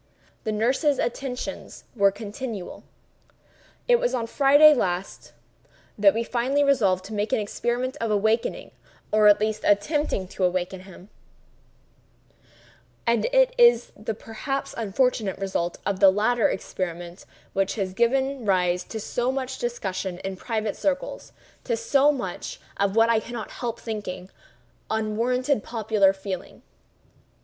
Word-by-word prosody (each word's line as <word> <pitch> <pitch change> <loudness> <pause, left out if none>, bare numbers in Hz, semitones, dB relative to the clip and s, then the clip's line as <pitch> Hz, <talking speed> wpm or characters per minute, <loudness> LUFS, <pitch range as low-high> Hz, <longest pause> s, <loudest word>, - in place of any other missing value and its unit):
The 220 - 0
nurses' 255 +7 +1
attentions 250 +1 -4
were 200 -3 +5
continual. 210 0 -7 1.1
It 485 -1 +5
was - - 0
on 235 -2 -1
Friday 290 +5 +6
last 185 -7 -3 0.6
that 205 0 +4
we 230 - 0
finally 255 +5 +1
resolved 200 -10 +2
to 220 - -8
make 210 +1 -1
the - - +1
experiment 240 +5 -2
of 230 - -1
awakening, 220 +2 0 0.4
or 215 0 +5
attempting 210 - +2
to 190 - -4
awaken 180 +1 0
him; 190 +1 -14 2.0
and 235 -1 +2
it - - +3
is 475 0 +5
the 215 +1 -5
(perhaps) 260 +6 -4
unfortunate 225 -1 0
result 190 -3 -2
of 200 -2 -1
this 195 -2 +7
latter 220 +3 +2
experiment 175 -1 -5 0.3
which 195 0 0
has 195 -4 -3
given 265 +4 +1
rise 180 -3 +1
to 220 - -6
so 245 +4 -1
much 265 -1 -4
discussion 190 -6 -3
in 195 0 -4
private 215 +1 -3
circles—to 275 -3 -4
so 275 +5 +3
much 245 -11 -5 0.2
of 200 0 0
what 225 0 +5
I 225 - +3
cannot 230 -1 -7
help 235 -1 -4
thinking 195 -5 -6 0.6
unwarranted 230 +4 0
popular 215 -4 +2
feeling. 190 -1 -7
220 Hz, 125 wpm, -25 LUFS, 195-250 Hz, 2.0 s, this